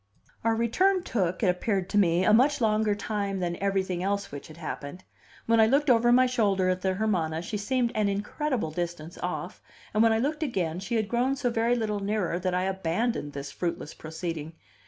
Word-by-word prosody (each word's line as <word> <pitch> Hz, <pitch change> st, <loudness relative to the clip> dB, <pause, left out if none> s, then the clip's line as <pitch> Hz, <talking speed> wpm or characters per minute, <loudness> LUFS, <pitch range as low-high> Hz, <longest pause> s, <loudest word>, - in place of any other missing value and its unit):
Our 225 Hz, 0 st, +2 dB
return 365 Hz, -, +2 dB
took, 185 Hz, -, -1 dB
it -, -, +4 dB
appeared 185 Hz, +1 st, 0 dB
to -, -, +1 dB
me, 175 Hz, -2 st, +3 dB
a 215 Hz, -, +5 dB
much 280 Hz, +6 st, +4 dB
longer 215 Hz, -2 st, +2 dB
time 200 Hz, -2 st, -2 dB
than 175 Hz, -1 st, -1 dB
everything 190 Hz, -2 st, -1 dB
else 200 Hz, +1 st, -1 dB
which 140 Hz, 0 st, -8 dB
had 155 Hz, -, -13 dB
happened. 160 Hz, +2 st, -6 dB, 0.4 s
When 230 Hz, 0 st, +3 dB
I 220 Hz, -, +6 dB
looked 280 Hz, +3 st, +3 dB
over 240 Hz, 0 st, +4 dB
my 255 Hz, +1 st, +6 dB
shoulder 200 Hz, -7 st, +1 dB
at 185 Hz, 0 st, 0 dB
the 190 Hz, 0 st, 0 dB
Hermana, 175 Hz, -6 st, 0 dB
she 210 Hz, -, -3 dB
seemed 240 Hz, +3 st, 0 dB
an 210 Hz, -2 st, +1 dB
incredible 210 Hz, -, -2 dB
distance 170 Hz, 0 st, -5 dB
off, -, -, -4 dB, 0.3 s
and 215 Hz, -, +3 dB
when 225 Hz, 0 st, +5 dB
I 220 Hz, -, +3 dB
looked 295 Hz, +6 st, -1 dB
again, 180 Hz, -, -1 dB
she 215 Hz, +5 st, -3 dB
had 215 Hz, -2 st, +1 dB
grown 245 Hz, +4 st, +1 dB
so 260 Hz, -3 st, -1 dB
very 230 Hz, +1 st, +2 dB
little 215 Hz, -3 st, -1 dB
nearer 200 Hz, -4 st, -1 dB
that 185 Hz, 0 st, -1 dB
I 180 Hz, -, +1 dB
abandoned 190 Hz, -2 st, -1 dB
this 140 Hz, 0 st, -6 dB
fruitless 170 Hz, -1 st, -4 dB
proceeding. 160 Hz, 0 st, -6 dB
200 Hz, 200 wpm, -27 LUFS, 180-230 Hz, 0.4 s, I